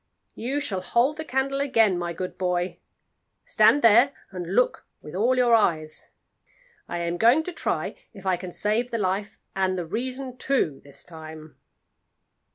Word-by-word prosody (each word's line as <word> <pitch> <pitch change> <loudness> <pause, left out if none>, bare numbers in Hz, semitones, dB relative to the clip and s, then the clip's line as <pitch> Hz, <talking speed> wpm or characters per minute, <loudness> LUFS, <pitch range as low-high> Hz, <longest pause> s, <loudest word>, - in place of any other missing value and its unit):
You 265 +5 -2
shall 195 -9 -2
hold 245 +10 +1
the 315 - -4
candle 275 -1 -1
again, 225 -8 +3
my 175 -1 -3
good 180 +2 -5
boy; 180 0 -1 0.7
stand 290 - +4
there, 235 +5 +6 0.2
and 180 0 -5
look 250 - +2 0.2
with 150 - -11
all 235 +7 +2
your 245 -2 +4
eyes. 160 -8 +1 0.8
I 175 - -3
am 170 0 -2
going 240 - +5
to 360 - -6
try - - -2 0.2
if 195 -4 -13
I 190 -1 +2
can 180 0 -7
save 215 +6 0
the 235 - -2
life 200 0 -2 0.2
and 190 -1 0
the 175 - -3
reason 255 +7 -4
too 250 - 0
this 140 -1 -12
time." 155 -2 -11
205 Hz, 165 wpm, -25 LUFS, 175-255 Hz, 0.8 s, there